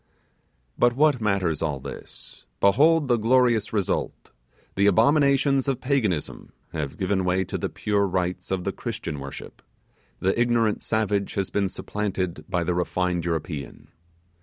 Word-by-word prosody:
But 120 Hz, 0 st, +4 dB
what 145 Hz, -3 st, +3 dB
matters 95 Hz, -7 st, 0 dB
all 75 Hz, -4 st, -1 dB
this? -, -, -10 dB
Behold 145 Hz, -, +4 dB
the 120 Hz, -2 st, +3 dB
glorious 115 Hz, -1 st, +3 dB
result! 100 Hz, -4 st, -2 dB, 0.4 s
The 100 Hz, +1 st, +2 dB
abominations 140 Hz, -, +3 dB
of 135 Hz, -3 st, 0 dB
Paganism 120 Hz, -, -1 dB, 0.2 s
have 75 Hz, -2 st, -4 dB
given 95 Hz, 0 st, 0 dB
way 90 Hz, +1 st, +1 dB
to -, -, -6 dB
the -, -, -2 dB
pure 100 Hz, -1 st, 0 dB
rites 90 Hz, -1 st, -2 dB
of 95 Hz, -1 st, -1 dB
the -, -, -1 dB
Christian 75 Hz, -, -5 dB
worship, 70 Hz, +1 st, -9 dB, 0.6 s
the 95 Hz, +5 st, +1 dB
ignorant 115 Hz, -3 st, +2 dB
savage 105 Hz, -3 st, -1 dB
has 100 Hz, -2 st, -1 dB
been 100 Hz, -2 st, 0 dB
supplanted 95 Hz, -7 st, -3 dB
by 85 Hz, -1 st, 0 dB
the 90 Hz, +1 st, 0 dB
refined 90 Hz, 0 st, -1 dB
European! 80 Hz, -3 st, -4 dB
100 Hz, 140 wpm, -25 LUFS, 90-120 Hz, 0.6 s, But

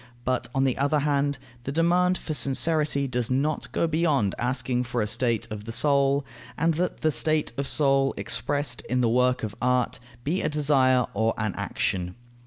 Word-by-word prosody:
But, 130 Hz, 0 st, -1 dB
on 135 Hz, -, +2 dB
the 130 Hz, -2 st, 0 dB
other 145 Hz, +2 st, +2 dB
hand, 145 Hz, -1 st, 0 dB, 0.3 s
the 135 Hz, -, -4 dB
demand 175 Hz, +4 st, +2 dB
for 155 Hz, -, -5 dB
sincerity 140 Hz, +2 st, +2 dB
does 125 Hz, -2 st, -1 dB
not 140 Hz, +4 st, -1 dB
go -, -, 0 dB
beyond 155 Hz, -, +1 dB
asking 125 Hz, 0 st, 0 dB
for 120 Hz, 0 st, -3 dB
a 105 Hz, -, +1 dB
state 115 Hz, 0 st, 0 dB
of 105 Hz, -1 st, -6 dB
the 115 Hz, -, -5 dB
soul, 140 Hz, +2 st, +2 dB, 0.3 s
and 165 Hz, +1 st, +2 dB
that 175 Hz, +3 st, -2 dB
the 155 Hz, -, +2 dB
state 155 Hz, -2 st, 0 dB
of 140 Hz, +1 st, -2 dB
soul 135 Hz, -2 st, +3 dB
expressed 125 Hz, +5 st, -2 dB
in 125 Hz, +1 st, +1 dB
the 120 Hz, -, +2 dB
work 125 Hz, +1 st, +2 dB
of 105 Hz, -2 st, -3 dB
art 125 Hz, 0 st, +1 dB, 0.2 s
be 165 Hz, +8 st, -1 dB
a 155 Hz, -, 0 dB
desire 135 Hz, -4 st, +3 dB
or 110 Hz, +2 st, 0 dB
an 110 Hz, -3 st, -1 dB
action. 90 Hz, -1 st, -2 dB
135 Hz, 185 wpm, -25 LUFS, 120-150 Hz, 0.3 s, soul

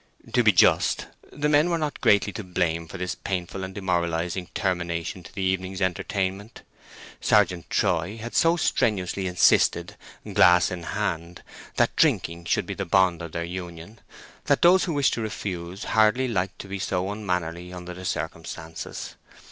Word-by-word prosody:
To -, -, +4 dB
be -, -, +6 dB
just, -, -, +3 dB, 0.3 s
the 150 Hz, +1 st, -1 dB
men 150 Hz, +3 st, +4 dB
were 170 Hz, -, +1 dB
not 150 Hz, -2 st, -3 dB
greatly 100 Hz, -1 st, +3 dB
to 105 Hz, -, -5 dB
blame 85 Hz, -3 st, -1 dB
for -, -, -8 dB
this 90 Hz, 0 st, -3 dB
painful 95 Hz, 0 st, -4 dB
and 95 Hz, 0 st, -7 dB
demoralizing 90 Hz, -1 st, -1 dB
termination 90 Hz, -2 st, -2 dB
to 85 Hz, -, -13 dB
the 100 Hz, -, -4 dB
evening's 95 Hz, 0 st, -1 dB
entertainment. 95 Hz, +3 st, -2 dB, 0.6 s
Sergeant 95 Hz, -5 st, +2 dB
Troy 90 Hz, +5 st, 0 dB
had 115 Hz, +1 st, -7 dB
so 165 Hz, +1 st, +4 dB
strenuously 95 Hz, -, 0 dB
insisted, 90 Hz, 0 st, +3 dB, 0.4 s
glass 90 Hz, +1 st, +5 dB
in 90 Hz, -1 st, -4 dB
hand, 85 Hz, -2 st, -3 dB, 0.3 s
that -, -, +2 dB
drinking 85 Hz, +1 st, +1 dB
should -, -, +1 dB
be -, -, -4 dB
the -, -, -3 dB
bond 90 Hz, -1 st, +2 dB
of 85 Hz, -2 st, -7 dB
their 85 Hz, -, -2 dB
union, 90 Hz, +3 st, -8 dB, 0.5 s
that -, -, +2 dB
those 180 Hz, +2 st, +6 dB
who 170 Hz, -, -2 dB
wished 145 Hz, -2 st, +2 dB
to 115 Hz, -, -2 dB
refuse 95 Hz, -3 st, -5 dB
hardly 110 Hz, +4 st, +3 dB
liked 95 Hz, -5 st, -2 dB
to -, -, -9 dB
be 100 Hz, 0 st, -5 dB
so 95 Hz, 0 st, -1 dB
unmannerly 90 Hz, -4 st, -3 dB
under 90 Hz, 0 st, -7 dB
the 90 Hz, +1 st, -10 dB
circumstances. 80 Hz, 0 st, -5 dB
95 Hz, 165 wpm, -25 LUFS, 85-105 Hz, 0.6 s, be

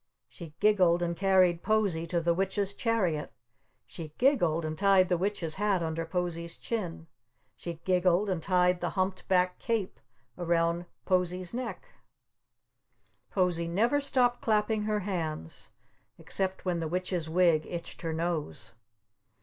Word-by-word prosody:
She 165 Hz, -4 st, -11 dB
giggled 180 Hz, -5 st, +4 dB
and 170 Hz, 0 st, -1 dB
carried 185 Hz, -2 st, +3 dB
Posie 200 Hz, -7 st, +1 dB
to 170 Hz, +1 st, 0 dB
the 170 Hz, 0 st, +2 dB
Witch's 195 Hz, +2 st, -1 dB
chariot. 200 Hz, -10 st, 0 dB, 0.5 s
She 155 Hz, -3 st, -9 dB
giggled 175 Hz, -, +2 dB
and 155 Hz, 0 st, -3 dB
tied 195 Hz, 0 st, +4 dB
the 180 Hz, -, +2 dB
Witch's 185 Hz, -4 st, -2 dB
hat 200 Hz, -3 st, +1 dB
under 165 Hz, 0 st, -3 dB
Posie's 170 Hz, -1 st, -3 dB
chin. 180 Hz, -8 st, -4 dB, 0.5 s
She 170 Hz, -1 st, -6 dB
giggled 185 Hz, +1 st, +3 dB
and 185 Hz, -4 st, -1 dB
tied 180 Hz, 0 st, +2 dB
the -, -, 0 dB
humped 185 Hz, 0 st, -1 dB
back 180 Hz, -1 st, +2 dB
cape 225 Hz, -5 st, -2 dB, 0.4 s
around 170 Hz, 0 st, +1 dB, 0.2 s
Posie's 180 Hz, 0 st, 0 dB
neck. 245 Hz, -, -5 dB, 1.4 s
Posie 175 Hz, -3 st, 0 dB
never 230 Hz, +12 st, +2 dB
stopped 250 Hz, -3 st, +2 dB
clapping 215 Hz, -1 st, +1 dB
her 210 Hz, -1 st, 0 dB
hands 160 Hz, -, -4 dB, 0.5 s
except 190 Hz, -1 st, -3 dB
when 180 Hz, -2 st, 0 dB
the 165 Hz, -, -2 dB
Witch's 180 Hz, -1 st, -2 dB
Wig 165 Hz, -2 st, +3 dB
itched 170 Hz, -1 st, -7 dB
her 165 Hz, -2 st, -2 dB
nose. 160 Hz, -, -3 dB
180 Hz, 135 wpm, -29 LUFS, 170-200 Hz, 1.4 s, giggled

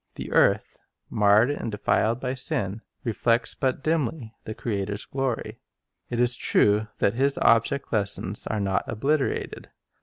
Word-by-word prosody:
The -, -, -7 dB
earth, -, -, +2 dB, 0.3 s
marred 105 Hz, +5 st, +4 dB
and 115 Hz, -5 st, -4 dB
denied 110 Hz, +3 st, 0 dB
by 125 Hz, 0 st, -3 dB
sin, 105 Hz, -5 st, -3 dB, 0.2 s
reflects 115 Hz, 0 st, +1 dB
but 135 Hz, 0 st, -2 dB
dimly 150 Hz, -7 st, -1 dB
the 110 Hz, -, -6 dB
Creator's 100 Hz, -2 st, -3 dB
glory. 135 Hz, -3 st, -3 dB, 0.5 s
It 120 Hz, -, -3 dB
is 120 Hz, 0 st, +5 dB
true 105 Hz, -1 st, +2 dB
that 100 Hz, -, +1 dB
His 135 Hz, +3 st, +1 dB
object 115 Hz, +5 st, +2 dB
lessons 100 Hz, -1 st, 0 dB
are 110 Hz, -, -2 dB
not 95 Hz, -1 st, 0 dB
obliterated. 135 Hz, +5 st, -2 dB
115 Hz, 140 wpm, -25 LUFS, 105-130 Hz, 0.5 s, is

